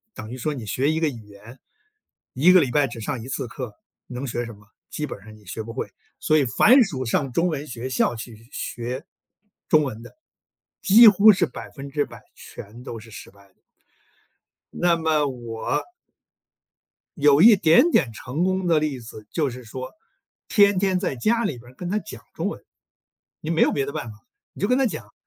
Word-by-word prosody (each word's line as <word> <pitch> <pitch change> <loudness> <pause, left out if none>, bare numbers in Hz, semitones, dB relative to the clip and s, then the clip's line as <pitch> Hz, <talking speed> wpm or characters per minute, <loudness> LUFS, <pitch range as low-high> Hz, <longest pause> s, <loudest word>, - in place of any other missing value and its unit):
等 110 +2 -8
于 130 - -6
说 150 +5 -2
你 120 -6 -7
学 135 +8 0
一 160 - 0
个 160 -2 +1
语 120 -4 -9
言。 105 +5 -14 0.7
1 155 +8 +5
个 185 - +7
礼 135 - 0
拜 145 +2 +3
只 115 -1 -9
上 125 +1 -3
1 - - -9
次 135 -2 -4
课， 120 -2 -7 0.3
能 125 +2 -6
学 120 -1 -3
什 115 - -9
么？ 105 0 -19 0.2
基 150 - -3
本 - - -7
上 110 0 -13
你 105 - -19
学 100 +5 -6
不 115 +1 -8
会， 130 - -4 0.3
所 155 - +2
以 140 - +3
凡 245 - +5
属 140 - -4
上 130 +2 -1
中 170 +7 +1
文 150 -3 -3
学 125 +1 -6
校 125 -2 +1
去 115 0 -10
学 125 +5 -5 0.6
中 155 -2 +5
文 115 -5 -5
的， - - -14 0.7
几 225 +3 +8
乎 210 +1 +8
是 180 -3 +1
100%， 140 +2 -6
全 110 +5 -11
都 115 -3 -7
是 115 +1 -14
失 105 - -11
败 100 0 -21
的。 95 - -33 1.2
那 175 -1 +2
么 160 -3 +1
我 120 - -4 1.3
有 145 -1 +5
一 220 0 +9
点 175 - +5
点 125 - +2
成 130 +9 -3
功 185 0 0
的 165 -2 +4
例 150 -4 -2
子， 110 -2 -11
就 150 -5 0
是 125 0 -10
说， 130 +3 -7 0.6
天 200 -3 +4
天 190 -1 +1
在 135 - -2
家 230 - +1
里 150 - -2
边 120 +1 -15
儿 - - -20
跟 175 +6 -6
他 210 - +1
讲 - - -10
中 - - -3
文。 - - -7 0.8
你 155 - -6
没 165 - +2
有 - - +4
别 140 -1 -1
的 140 - -5
办 120 - -5
法， 105 - -14 0.3
你 - - -13
就 200 - +1
跟 250 - +3
他 270 - +3
讲。 120 - -6
135 Hz, 210 characters per minute, -23 LUFS, 115-165 Hz, 1.3 s, 一